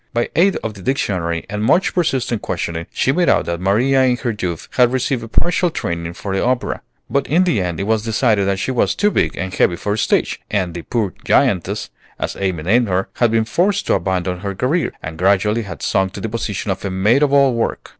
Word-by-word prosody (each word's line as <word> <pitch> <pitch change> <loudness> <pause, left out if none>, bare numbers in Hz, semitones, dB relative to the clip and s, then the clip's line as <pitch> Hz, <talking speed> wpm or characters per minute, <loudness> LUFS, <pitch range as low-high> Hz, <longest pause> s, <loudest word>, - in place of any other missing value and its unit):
By 120 0 -1
aid 190 +3 +4
of 110 - -3
the 100 - -12
dictionary 90 -8 -1
and 105 0 -3
much 180 +11 +3
persistent 130 - 0
questioning, 85 -2 -3
she 130 - +1
made 175 +5 +2
out - - +3
that 85 0 -3
Maria 120 +8 +3
in 125 -1 +2
her 120 - -2
youth 90 -5 -4
had 125 -1 +3
received 130 -1 -1
a - - -6
partial 175 +9 +1
training 85 - -4
for 95 +2 -4
the 95 - 0
opera; 125 0 -1 0.3
but 140 0 0
in 170 +5 +3
the 170 - +1
end 85 -3 -3
it - - -1
was 110 +1 +1
decided 110 -2 +1
that 100 -1 +1
she 130 - -2
was 125 - +1
too 210 +1 +2
big - - 0
and 95 0 -4
heavy 85 - +2
for 105 +4 -2
the 110 - -2
stage, - - +1
and 95 -4 -1
the 85 - -5
poor 105 -1 -2
"giantess," - - +1 0.3
as - - -3
Amy 95 -5 -1
named 115 +7 +3
her, 95 0 -1
had 120 - +3
been 110 0 +1
forced 195 - +1
to - - +2
abandon 90 -1 -1
her 100 +1 -4
career, 145 - 0
and 80 0 -7
gradually 100 +4 +2
had 95 -8 -8
sunk 95 0 +1
to - - -6
the 110 - -3
position 105 -3 -3
of 95 - -4
a 100 - -2
maid 105 +8 +2
of 145 -2 +3
all 140 -2 +4
work. 115 -1 -2
105 Hz, 235 wpm, -19 LUFS, 95-130 Hz, 0.3 s, aid